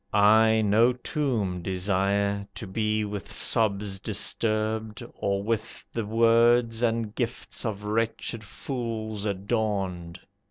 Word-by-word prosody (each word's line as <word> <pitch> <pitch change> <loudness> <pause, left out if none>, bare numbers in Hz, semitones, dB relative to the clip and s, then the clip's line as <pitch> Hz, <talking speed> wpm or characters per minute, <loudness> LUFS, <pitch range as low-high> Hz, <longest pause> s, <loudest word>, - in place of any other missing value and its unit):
I 110 +2 +5
no 110 +4 +4
tomb 120 - -2
Desire, 100 +2 0
to - - -6
be 105 +2 -1
with 105 -3 -6
sobs 100 -3 +2
disturbed, 110 +1 -1
or 100 0 -1
with 110 +1 -3
The 115 -3 -3
words 115 +1 +3
and 115 -2 0
gifts 120 0 -3
of 105 -2 -4
wretched 110 +1 -2
fools 110 -2 -4
adorned. 95 -4 -2
110 Hz, 110 wpm, -26 LUFS, 100-115 Hz, -, I